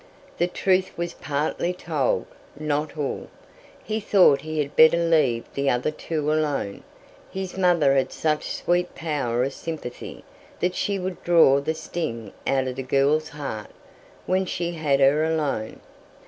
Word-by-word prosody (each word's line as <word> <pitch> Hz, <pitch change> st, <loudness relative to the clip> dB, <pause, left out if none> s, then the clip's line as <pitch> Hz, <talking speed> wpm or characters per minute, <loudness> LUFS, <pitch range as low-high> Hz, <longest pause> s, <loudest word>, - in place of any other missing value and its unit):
The 175 Hz, -, +3 dB
truth 185 Hz, +1 st, +1 dB
was 170 Hz, 0 st, -3 dB
partly 155 Hz, +4 st, -2 dB
told, 155 Hz, -7 st, -1 dB, 0.3 s
not 150 Hz, +1 st, -2 dB
all. 145 Hz, -2 st, -3 dB, 0.6 s
He 215 Hz, +1 st, -2 dB
thought 190 Hz, -9 st, +5 dB
he 155 Hz, 0 st, -5 dB
had 145 Hz, -2 st, -2 dB
better 160 Hz, +1 st, +7 dB
leave 155 Hz, -9 st, +2 dB
the 140 Hz, 0 st, 0 dB
other 125 Hz, +5 st, +1 dB
two 155 Hz, -1 st, -2 dB
alone. 145 Hz, -10 st, -1 dB, 0.5 s
His 190 Hz, -1 st, -5 dB
mother 175 Hz, -7 st, +3 dB
had 135 Hz, -1 st, +1 dB
such 155 Hz, -1 st, -1 dB
sweet 175 Hz, 0 st, 0 dB
power 135 Hz, -7 st, -1 dB
of 135 Hz, +1 st, -2 dB
sympathy, 155 Hz, -7 st, -7 dB, 0.4 s
that 180 Hz, +1 st, 0 dB
she 200 Hz, +1 st, -1 dB
would 185 Hz, -1 st, -5 dB
draw 165 Hz, -6 st, +5 dB
the 155 Hz, +3 st, -2 dB
sting 115 Hz, -, -5 dB
out 135 Hz, -1 st, +1 dB
of 130 Hz, 0 st, -5 dB
the -, -, -2 dB
girl's 140 Hz, +4 st, +2 dB
heart 135 Hz, -8 st, -6 dB, 0.6 s
when 185 Hz, 0 st, +1 dB
she 170 Hz, -1 st, -2 dB
had 155 Hz, -5 st, +1 dB
her 140 Hz, +3 st, +4 dB
alone. 150 Hz, -9 st, -1 dB
155 Hz, 150 wpm, -24 LUFS, 140-170 Hz, 0.6 s, better